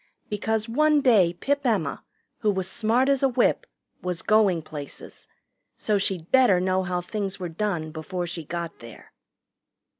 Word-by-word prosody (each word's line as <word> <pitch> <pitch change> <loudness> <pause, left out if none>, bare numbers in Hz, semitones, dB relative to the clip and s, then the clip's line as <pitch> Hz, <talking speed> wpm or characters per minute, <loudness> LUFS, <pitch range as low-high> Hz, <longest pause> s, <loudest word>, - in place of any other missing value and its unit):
Because 215 +1 -1
one 300 +5 +3
day 210 -10 +5
Pip 280 +11 -1
Emma, 200 - 0 0.4
who 215 - +1
was 190 -2 -1
smart 225 +6 +1
as 275 -1 +2
a 270 - +4
whip, 250 0 +1 0.3
was 180 -1 -4
going 200 -6 +3
places, 150 -2 -9 0.5
so 210 -2 0
she'd 185 -4 -3
better 250 -9 +5
know 185 +1 +1
how 180 -1 -2
things 195 +1 -4
were 180 -2 -4
done 165 -3 -2
before 175 +3 -4
she 170 -1 -5
got 170 +2 -5
there. 115 -2 -13
190 Hz, 155 wpm, -25 LUFS, 175-225 Hz, 0.5 s, day